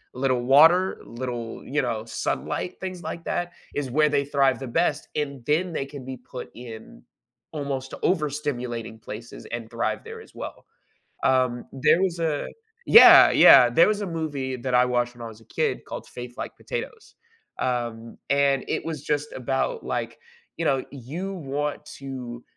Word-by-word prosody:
Little 130 -1 +1
water, 165 +8 +5
little, 120 -1 -6
you 150 +3 0
know, 115 -3 -2
sunlight, 180 +8 -3
things 185 -2 -6
like 165 +1 -5
that 175 0 -2 0.2
is 140 -3 -2
where 150 +3 +3
they 140 -1 +1
thrive 135 -3 +2
the 135 - -6
best, 155 -3 -1
and 140 -4 -3
then 170 +4 +1
they 135 - -2
can 140 -1 -9
be 130 -1 -6
put 125 0 -9
in 115 -2 -11 0.5
almost 140 -3 -4
overstimulating 130 -9 -2
places 115 +3 -9
and 115 -1 -5
thrive 115 0 -2
there 455 0 -8
as - - -17
well. - - -8 0.6
Um, 130 -2 +2 0.2
there 170 - +6
was 175 -3 0
a 155 -3 -1 0.4
Yeah 455 - +10
yeah, 125 -3 +8
there 165 +11 +5
was 210 -1 0
a - - -2
movie 145 -6 -3
that 125 0 -3
I 125 0 +6
watched 120 -1 0
when 120 - -11
I 115 - -5
was 110 0 -13
a - - -23
kid - - 0
called - - -7
Faith 125 0 -8
Like - - -6
Potatoes, 465 -2 -7 0.4
um, 115 -2 -3
and 140 -1 +3
it - - -2
was 155 -4 -5
just 150 0 -1
about 135 - -2
like, - - -3 0.4
you 165 - -1
know, 135 -3 +1
you 155 +9 -6
want 145 -2 -3 0.2
to, 125 -3 -7
135 Hz, 170 wpm, -25 LUFS, 125-155 Hz, 0.6 s, Yeah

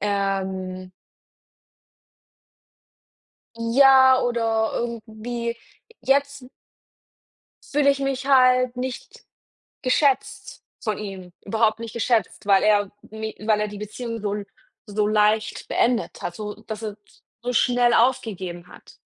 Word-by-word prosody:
ähm. 190 -2 -2 2.7
Ja 260 +2 +6
oder 225 -2 0
irgendwie 235 0 -4 0.4
jetzt 280 -1 0 1.2
fühle 285 -1 +4
ich 275 - 0
mich 275 -1 -2
halt 255 -2 +4
nicht 255 0 -6 0.6
geschätzt 270 +1 0 0.2
von 215 -1 -2
ihm, 190 -4 -8
überhaupt 220 +1 +1
nicht 230 -1 -7
geschätzt, 235 -2 0
weil 195 -1 +5
er 205 -2 +3 0.2
mi 220 0 -6
weil 215 0 +1
er 210 - 0
die 205 -1 -9
Beziehung 230 +2 -6
so 205 0 -2 0.4
so 210 0 -1
leicht 215 0 +1
beendet 240 0 0
hat, 175 - -4
so 210 +1 -6
dass 220 0 -6
er 210 -2 -4 0.5
so 245 +1 -3
schnell 245 -1 +3
aufgegeben 195 -9 0
hat. - - -16
225 Hz, 110 wpm, -23 LUFS, 210-250 Hz, 2.7 s, Ja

